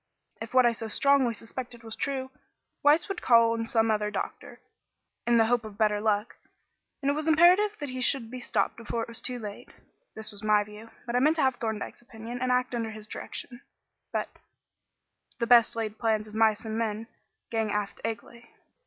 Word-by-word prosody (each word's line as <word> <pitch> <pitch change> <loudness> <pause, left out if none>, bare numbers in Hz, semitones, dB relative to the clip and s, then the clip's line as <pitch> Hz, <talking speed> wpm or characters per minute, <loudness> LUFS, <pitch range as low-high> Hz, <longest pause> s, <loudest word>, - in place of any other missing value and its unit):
If 225 - -6
what 255 -1 +7
I 240 - +5
so 225 -1 -5
strongly 265 0 +3
suspected 240 +1 -8
was 225 -1 -6
true, 265 -1 -3 0.5
Weiss 295 +3 +4
would 390 -2 -4
call 230 -1 +5
in 230 0 -2
some 225 -1 +2
other 210 -1 0
doctor, 210 - -5 0.7
in 240 0 +5
the 225 - +5
hope 240 +1 +2
of 215 -2 -10
better 210 -1 +2
luck, 210 0 0 0.7
and 280 - +3
it - - +1
was 305 +2 -3
imperative 360 +7 +5
that 290 - -5
he 255 0 -4
should 245 -3 +1
be 255 - -6
stopped - - 0
before 230 0 -3
it - - -7
was 235 0 -6
too 250 +1 -2
late. 210 -3 -8 0.5
This 220 0 -5
was 205 -1 -7
my 210 -1 +3
view, 210 +2 -12 0.2
but 240 0 -3
I - - +4
meant 305 +5 +4
to 315 - +1
have 260 -2 +2
Thorndyke's 220 -1 -4
opinion, 235 +1 -8
and 255 0 +1
act 250 0 +1
under 230 -2 -2
his 215 -1 -8
direction, 240 +3 -7 0.5
but - - -1 1.1
"The 235 - 0
best 235 -1 +6
laid 220 -1 -3
plans 220 -2 +1
of 210 - -13
mice 220 0 +2
and 220 0 -3
men 220 -1 -2 0.5
Gang 225 -2 0
aft 205 -1 -3
agley." 230 +1 -6
230 Hz, 200 wpm, -28 LUFS, 220-250 Hz, 1.1 s, what